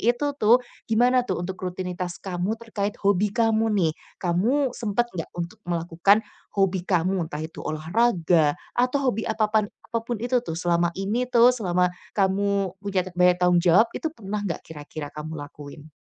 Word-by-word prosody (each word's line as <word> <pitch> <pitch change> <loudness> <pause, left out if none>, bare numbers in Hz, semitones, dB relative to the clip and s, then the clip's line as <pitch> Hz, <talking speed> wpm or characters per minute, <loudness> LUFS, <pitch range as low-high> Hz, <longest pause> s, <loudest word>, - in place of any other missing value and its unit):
itu 245 +5 +1
tuh, 220 +3 +7 0.3
gimana 245 +3 +4
tuh - - -2
untuk 185 +1 -4
rutinitas 180 -1 -4
kamu 190 +3 -2
terkait 210 -1 -3
hobi 200 +1 +3
kamu 225 -1 +2
nih? 170 -4 +3 0.3
Kamu 235 +11 +2
sempat 240 +1 0
nggak 165 -3 -5
untuk 170 0 -5
melakukan 170 +4 +2 0.3
hobi 190 -2 +1
kamu? 180 -1 +1
Entah 155 -1 -5
itu 160 - -8
olahraga, 165 -2 +2 0.2
atau 255 +2 +2
hobi 220 +1 -3
apapan 215 -1 +2 0.3
apa 230 -1 -2
pun 235 -2 -3
itu 245 +1 +2
tuh 165 -9 -5
selama 170 0 +1
ini 210 +6 -1
tuh, 245 0 +6
selama 180 -7 +1 0.2
kamu 195 -1 +1
punya 200 -2 -1
ta 185 - -8
banyak 180 0 +4
tanggung 180 -1 +5
jawab, 185 +7 +5
itu - - -4
pernah 210 -2 -4
nggak 200 -5 -3
kira-kira 150 -1 -8
kamu 155 +1 -7
lakuin? 145 +1 -10
195 Hz, 165 wpm, -25 LUFS, 175-225 Hz, 0.3 s, tuh